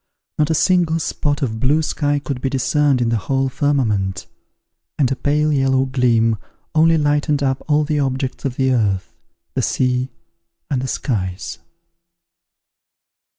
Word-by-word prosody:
Not 150 0 +2
a 160 - +2
single 170 0 +2
spot 145 -2 -1
of 110 -4 -2
blue 145 +6 +2
sky 145 -1 0
could 140 -3 -4
be 135 - 0
discerned 135 0 +1
in 115 - 0
the 115 - +1
whole 135 +6 0
firmament; 110 -10 0 0.7
and 135 -4 +2
a - - +1
pale 150 +3 +1
yellow 135 -1 +2
gleam 115 -4 +2 0.3
only 160 +1 +4
lightened 145 -1 +1
up 135 -1 0
all 150 0 +3
the 150 0 -1
objects 130 -1 -2
of 135 -3 -2
the 130 0 +1
earth, 100 -6 0 0.4
the - - 0
sea, 125 0 0 0.6
and 130 -3 +1
the 130 - -3
skies. 95 - -3
135 Hz, 150 wpm, -19 LUFS, 125-145 Hz, 0.7 s, only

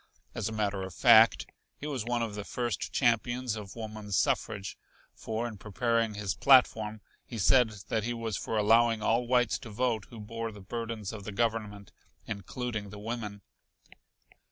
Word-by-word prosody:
As - - -2
a - - -7
matter 105 -3 -1
of 95 -1 -6
fact, 115 -1 +6 0.3
he - - -8
was 140 -6 -2
one 120 0 0
of 110 -2 -4
the 105 0 -5
first 120 +2 -3
champions 120 -1 +1
of 105 -3 -8
woman's 110 -3 -4
suffrage, 100 -1 0 0.4
for 115 +2 -3
in 110 -4 -9
preparing 115 +1 0
his 100 -2 -2
platform 110 -5 +4 0.2
he 115 - -8
said 125 +3 +5 0.2
that 110 -2 0
he 120 - -2
was 115 -3 -3
for 110 - -2
allowing 115 +1 +4
all 115 +3 +2
whites 125 -2 +2
to 120 - -10
vote 110 -1 -1
who 115 - -10
bore 115 +2 -5
the 105 - -11
burdens 115 0 -5
of 105 -2 -7
the 105 - -6
Government, 105 -2 -2 0.3
including 110 +1 -4
the 105 - -9
women. 105 -2 -5
110 Hz, 170 wpm, -30 LUFS, 105-120 Hz, 0.4 s, fact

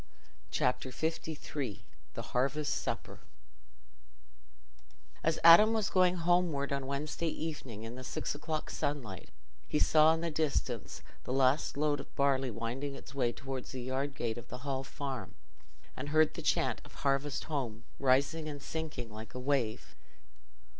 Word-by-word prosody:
Chapter 125 +1 +1 0.6
LIII 130 -9 -3 0.3
The - - -3
Harvest 140 +4 +1
Supper - - -3 2.0
As 160 0 +2
Adam 170 +7 +10
was 220 -3 +1
going 185 -1 +4
homeward, 170 -5 +2
on 140 -1 -2
Wednesday 150 +4 -2
evening, 145 -9 -4
in 115 +1 -6
the 130 +1 -7
six - - -2
o'clock 155 +1 -3
sunlight, 120 - -3 0.4
he - - 0
saw 155 - +6
in 165 - -4
the 170 -1 -1
distance 140 -7 -1 0.2
the - - -5
last 135 +2 +3
load 145 -1 +2
of - - -10
barley 135 -2 +2
winding 120 +5 -3
its 135 - -11
way 125 -4 +1
towards 135 0 -6
the 130 -1 -4
yard 135 +2 -2
gate 120 -2 -2
of - - -12
the 125 +3 -8
Hall 135 -1 -1
Farm, 135 -2 -5 0.6
and 140 +3 -5
heard 155 0 +4
the - - -6
chant - - +1
of - - -15
"Harvest 140 0 +1
Home!" 125 -8 -3 0.2
rising 140 +4 +2
and 145 -1 -5
sinking 150 -7 -4
like 110 +1 -9
a - - -3
wave. 125 -4 0
140 Hz, 150 wpm, -33 LUFS, 125-155 Hz, 2.0 s, Adam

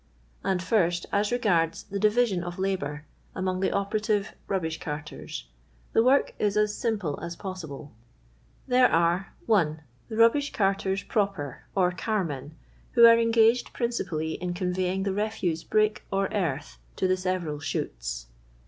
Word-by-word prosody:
And 185 -1 0
first, 175 -4 +1
as 205 +1 +1
regards 180 -9 +1
the 200 0 -5
divmon 215 -2 +3
of 175 0 -6
labour 155 -6 -2 0.3
among 185 0 -1
the 190 - +1
operative 205 +1 0
rubbish 165 -5 -2
carters, 155 - -6 0.5
the 225 - +5
work 265 +3 +3
is 210 -1 +1
as 210 0 +2
simple 205 -11 -2
as 170 +1 -5
possible. 160 - -7 0.7
'1 250 -1 +2
here 250 - +8
arc 170 +3 +2
— - - -26
1. 160 -9 +2 0.3
The 220 - -5
RtiUiish 230 +6 +4
Curtcrs 195 -4 0
proper, 195 - -2
or 180 -2 +3
"carmen," 165 - -3 0.4
who 235 -1 +8
are 230 0 +8
engaged 230 +1 +3
priucipaily 160 -10 -2
in 180 0 -3
conveying 185 +1 -1
the 195 -1 -1
refuse 200 -6 -1
brick 215 0 +1
or 195 0 +1
earth 155 -8 -2 0.2
to 190 - +1
the 185 - +3
several 185 -5 -2
shoots. - - -4
190 Hz, 150 wpm, -27 LUFS, 165-215 Hz, 0.7 s, here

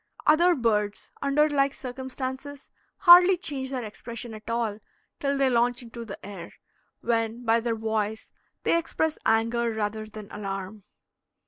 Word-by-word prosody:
Other 340 +4 +5
birds, 210 -4 -1
under 280 +2 +3
like 280 -2 +1
circumstances, 260 +2 -6 0.3
hardly 360 0 +9
change 280 -7 -4
their 260 -2 -3
expression 230 +2 -7
at 215 +1 -10
all 230 -3 -1 0.4
till 280 0 0
they 275 -1 +3
launch 245 0 +2
into 235 0 -8
the 200 - -7
air, 190 -4 -9 0.5
when 230 +1 -1
by 225 0 +4
their 230 0 -1
voice 220 -1 -2 0.3
they 335 - +3
express 320 -1 -2
anger 230 +1 +2
rather 215 0 -3
than 215 -1 -10
alarm. 195 0 -6
235 Hz, 140 wpm, -26 LUFS, 220-275 Hz, 0.5 s, hardly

